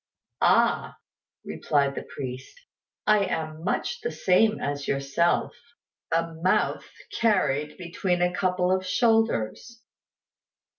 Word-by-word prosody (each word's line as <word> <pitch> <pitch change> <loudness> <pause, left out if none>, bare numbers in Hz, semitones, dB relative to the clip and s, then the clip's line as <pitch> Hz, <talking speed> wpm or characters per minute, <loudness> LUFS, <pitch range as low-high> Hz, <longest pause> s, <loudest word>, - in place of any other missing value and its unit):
"Ah," - - +2 0.5
replied 140 -2 0
the - - -5
priest, 130 - -8 0.5
"I 215 -1 +4
am 160 -3 -4
much 480 - -2
the 465 - -2
same 215 +4 +2
as 145 0 -3
yourself 140 +5 0 0.6
a 165 0 0
mouth 185 +2 +1 0.3
carried 150 -10 +1
between 175 0 -1
a 180 0 +1
couple 180 -1 0
of 185 0 +1
shoulders." 225 - 0
180 Hz, 105 wpm, -26 LUFS, 145-200 Hz, 0.6 s, I